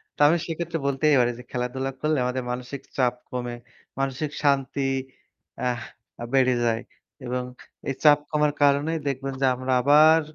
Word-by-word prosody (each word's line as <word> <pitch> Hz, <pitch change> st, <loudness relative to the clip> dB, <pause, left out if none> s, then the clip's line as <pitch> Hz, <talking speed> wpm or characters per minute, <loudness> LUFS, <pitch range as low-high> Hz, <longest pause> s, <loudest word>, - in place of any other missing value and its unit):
তো -, -, -24 dB
আমি 165 Hz, +3 st, +4 dB
সেক্ষেত্রে 165 Hz, 0 st, -3 dB
বলতেই 145 Hz, +2 st, +3 dB
পারি 120 Hz, -1 st, +3 dB
যে -, -, -9 dB
খেলাধুলা 130 Hz, +2 st, -2 dB
করলে 155 Hz, 0 st, +1 dB
আমাদের 125 Hz, +1 st, -2 dB
মানসিক 125 Hz, +2 st, -5 dB, 0.2 s
চাপ 125 Hz, -2 st, +3 dB, 0.2 s
কমে, 120 Hz, -1 st, -4 dB, 0.4 s
মানসিক 135 Hz, +2 st, -2 dB
শান্তি 140 Hz, -1 st, +1 dB, 0.9 s
আহ 125 Hz, -1 st, -1 dB, 0.5 s
বেড়ে 130 Hz, -2 st, +4 dB
যায়। 115 Hz, 0 st, +1 dB, 0.4 s
এবং 125 Hz, +1 st, -2 dB, 0.5 s
এই 135 Hz, -, -2 dB
চাপ 150 Hz, -2 st, +7 dB
কমার 150 Hz, -1 st, +2 dB
কারণেই 145 Hz, +3 st, +3 dB
দেখবেন 135 Hz, 0 st, -2 dB
যে -, -, +4 dB
আমরা 130 Hz, +1 st, -3 dB
আবার 155 Hz, +4 st, +6 dB
135 Hz, 150 wpm, -25 LUFS, 125-150 Hz, 0.9 s, চাপ